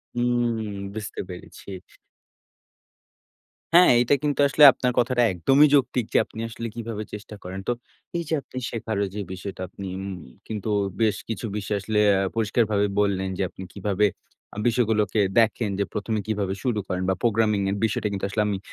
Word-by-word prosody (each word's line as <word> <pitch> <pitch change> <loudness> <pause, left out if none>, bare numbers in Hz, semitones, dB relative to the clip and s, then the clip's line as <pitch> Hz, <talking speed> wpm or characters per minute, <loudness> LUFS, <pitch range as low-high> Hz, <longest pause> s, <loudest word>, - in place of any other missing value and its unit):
হুম 120 -3 0 0.2
বুঝতে 110 -2 -6
পেরেছি। 90 +2 -10 2.0
হ্যাঁ, 180 +1 +8
এইটা 125 +4 +4
কিন্তু 145 -1 0
আসলে 145 +2 +4
আপনার 125 0 -1
কথাটা 125 0 +2
একদমই 135 - +5
যৌক্তিক 130 -4 +2
যে - - +5
আপনি - - -11
আসলে 115 +1 -5
কীভাবে 115 -2 -4
চেষ্টা 105 0 -8
করেন। 95 +1 -6
তো - - +2 0.5
এই 170 - -2
যে - - -1
আপনি 130 - -12
শেখার 110 -2 -3
ওই 100 - -2
যে 105 - -2
বিষয়টা 95 0 -7
আপনি 100 +1 -8 0.2
উম 95 0 -5 0.3
কিন্তু 110 -1 -4 0.3
বেশ 110 -2 +3
কিছু 115 +1 -3
বিষয় 105 0 -2
আসলে 105 0 0
অ্যা 95 - +3
পরিষ্কারভাবেই 105 -2 +1
বললেন 95 -2 0
যে - - -2
আপনি 95 - -10
কীভাবে 100 0 +1 0.5
আ - - -10
বিষয়গুলোকে 110 -3 +1 0.2
দেখেন 115 -1 +2
যে 100 - +2
১মে 105 +1 -2
কীভাবে 100 -3 -1
শুরু 120 -5 0
করেন 90 0 -2
বা 95 - +2
প্রোগ্রামিং 110 -3 +2
এর 100 - -1
বিষয়টা 105 0 -1
কিন্তু 100 -1 -2
আসলে 105 +2 0
আমি 100 -2 -1
110 Hz, 170 wpm, -24 LUFS, 100-120 Hz, 2.0 s, হ্যাঁ